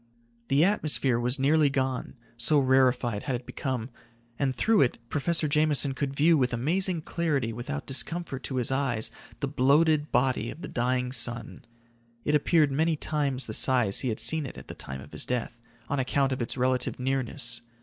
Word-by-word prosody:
The 140 +5 +4
atmosphere 150 - +1
was 125 +3 0
nearly 145 +2 +3
gone, 130 -1 -2 0.2
so 120 +6 +2
rarefied 130 -5 +2
had 135 -3 -2
it 125 +1 -6
become, 130 -3 -4 0.5
and 135 -2 0
through 220 - +3
it 125 - +2
Professor 160 +3 0
Jameson 150 -2 +2
could 135 0 -3
view 160 +4 +4
with 125 -1 +1
amazing 170 +6 +1
clarity 145 -10 -1
without 135 +5 -5
discomfort 140 0 -1
to 135 - -4
his 125 0 +1
eyes 130 -5 -1 0.3
the 140 - 0
bloated 145 +3 +2
body 125 -3 +1
of 165 - -9
the - - -4
dying 125 +1 -1
sun. 120 -1 0 0.6
It 150 - +1
appeared 150 0 +3
many 160 +4 +1
times 145 -3 -1
the 110 - -6
size 120 -5 +4
he 130 - 0
had 110 - -3
seen 145 +6 +1
it - - -10
at - - -12
the - - -5
time 65 0 -7
of 70 - -13
his - - -3
death, 125 -2 -3 0.3
on 140 - -1
account 135 +1 +1
of 130 - -2
its 120 - -4
relative 130 0 0
nearness. 130 -2 -3
135 Hz, 180 wpm, -27 LUFS, 125-150 Hz, 0.6 s, The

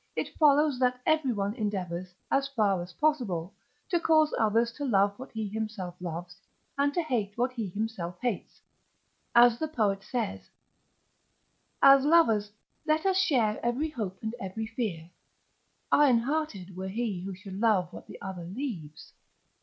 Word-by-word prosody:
it - - -3
follows 295 -3 +4
that 250 -1 +2
everyone 245 -11 +1
endeavours, 185 -6 -3 0.2
as 275 0 +2
far 210 -9 +1
as 175 +1 -8
possible, 210 - 0 0.3
to 345 - +1
cause 310 -2 +3
others 225 +2 +2
to 285 - -7
love 200 -6 +3
what 260 - -9
he 220 -2 -3
himself 210 -4 -4
loves, 175 0 -6 0.4
and 280 0 +2
to 345 +4 0
hate 220 -8 -2
what 245 +2 +1
he 230 -5 -4
himself 185 -3 -4
hates: 240 -6 -3 0.7
as 240 0 +7
the 315 - -1
poet 210 -9 0
says: 230 -1 -4 1.3
"As 275 0 +8
lovers 230 -10 +4 0.3
let 310 +1 +1
us 380 -1 +3
share 255 - +2
every 250 +7 0
hope 205 -9 -4
and 220 +1 -2
every 195 +3 -4
fear: 215 -8 -4 0.9
ironhearted 250 - +2
were 190 +1 -5
he 210 -3 -2
who 190 +1 -5
should 190 0 -8
love 210 -5 +2
what - - -10
the - - -11
other 185 -3 -6
leaves." 185 - -6
225 Hz, 150 wpm, -29 LUFS, 195-275 Hz, 1.3 s, As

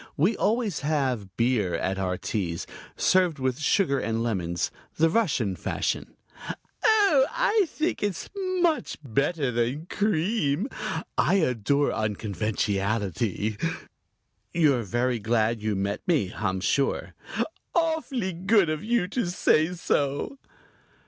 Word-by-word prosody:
We 185 +10 +3
always 220 -5 0
have 130 -10 -1
beer 115 -6 +2
at 95 +1 -1
our 90 -1 -1
teas 85 -6 -3 0.3
served 180 -4 +3
with 130 -1 -1
sugar 155 -3 +2
and 115 +1 -1
lemons, 85 -7 -1 0.3
the 160 +1 +4
Russian 135 - +1
fashion." - - -2 0.7
"Oh, 400 -11 +5
I 450 -5 +2
think 315 +2 -2
it's 205 -4 -2 0.3
much 335 -3 +1
better 140 +2 0
than 120 +7 -1
cream. 185 - 0 0.5
I - - +4
adore 140 - +2
unconventionality." 105 0 -1 0.9
"You're 150 -7 +3
very 120 +3 0
glad 110 +1 +1
you 105 -1 0
met 100 +2 -2
me, 145 - +1
I'm 95 -3 -1
sure." 135 +7 0 0.6
"Awfully 295 - 0
good 190 0 +3
of 155 +3 -3
you 225 -4 +1
to 230 -2 -1
say 160 -2 +3
so." 145 - -1
140 Hz, 115 wpm, -26 LUFS, -, 0.9 s, Oh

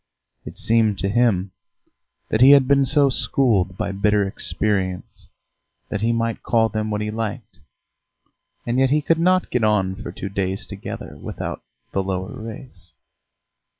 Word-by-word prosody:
It - - -9
seemed 110 -3 +2
to 100 - -1
him 100 -4 +1 0.8
that 110 - 0
he 130 - +9
had 140 -2 +5
been 140 -1 +3
so 145 -1 +4
schooled 100 -9 +1
by - - -2
bitter 105 +1 +2
experience 95 -2 -2 0.6
that 105 - -3
he 115 +1 +2
might 115 -1 -1
call 115 -2 +2
them 110 0 -3
what 105 0 -2
he 105 0 -3
liked, 110 -3 -5 1.1
and 120 +2 0
yet 135 0 +3
he 150 +2 +1
could 165 +2 +2
not 185 +2 +2
get 125 -2 0
on 100 -3 +2
for 105 -3 -7
two 95 +2 -6
days 95 0 -2
together 100 -1 -8
without - - -6 0.3
"the 100 - 0
lower 95 -1 -4
race." 110 -2 -10
110 Hz, 155 wpm, -21 LUFS, 100-125 Hz, 1.1 s, he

